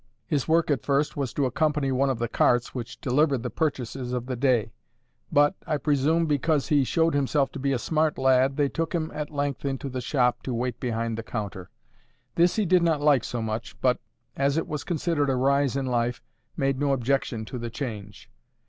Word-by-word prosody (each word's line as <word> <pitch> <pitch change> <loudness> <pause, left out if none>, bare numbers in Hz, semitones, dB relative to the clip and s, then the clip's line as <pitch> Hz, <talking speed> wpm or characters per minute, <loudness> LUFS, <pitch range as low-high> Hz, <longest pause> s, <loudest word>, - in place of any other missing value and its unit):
His 145 -6 -1
work 165 -1 +3
at 140 - +1
first 140 0 0
was 140 -4 -2
to 140 - +1
accompany 145 +1 0
one 135 +1 +2
of 130 - 0
the 120 +1 -1
carts 120 +1 +2
which 120 -3 -6
delivered 135 -1 +2
the - - -3
purchases 130 -4 -2
of 125 -1 -2
the 130 0 -3
day; 125 -4 +1 0.6
but, 145 +3 +4
I 155 - +1
presume 150 +3 +2
because 150 0 +1
he 145 -2 +4
showed 165 +5 +1
himself 140 0 +1
to - - -7
be 140 +1 0
a 135 - +1
smart 155 +4 0
lad, 130 +1 +3
they 145 -1 +3
took 165 +4 -3
him 160 -2 -2
at 150 -1 -4
length 145 -2 -2
into 135 0 -3
the 130 0 -4
shop 125 -2 +1
to 125 - -3
wait 125 +1 -2
behind 115 -2 -2
the - - -2
counter. 100 -6 -5 0.6
This 170 +1 +3
he 215 - +1
did 180 0 +4
not 165 -3 +2
like 145 -5 +4
so 120 -2 -3
much, 110 +1 -5
but, 125 -2 +2 0.4
as 140 +2 +1
it 165 - -1
was 150 -3 -4
considered 160 -4 0
a 135 - +2
rise 140 +1 +2
in 135 - -1
life, 120 -1 -1 0.3
made 135 -1 0
no 140 -1 +2
objection 125 -3 -1
to 125 +3 -6
the 120 0 -4
change. 110 -6 -7
135 Hz, 210 wpm, -26 LUFS, 125-150 Hz, 0.6 s, but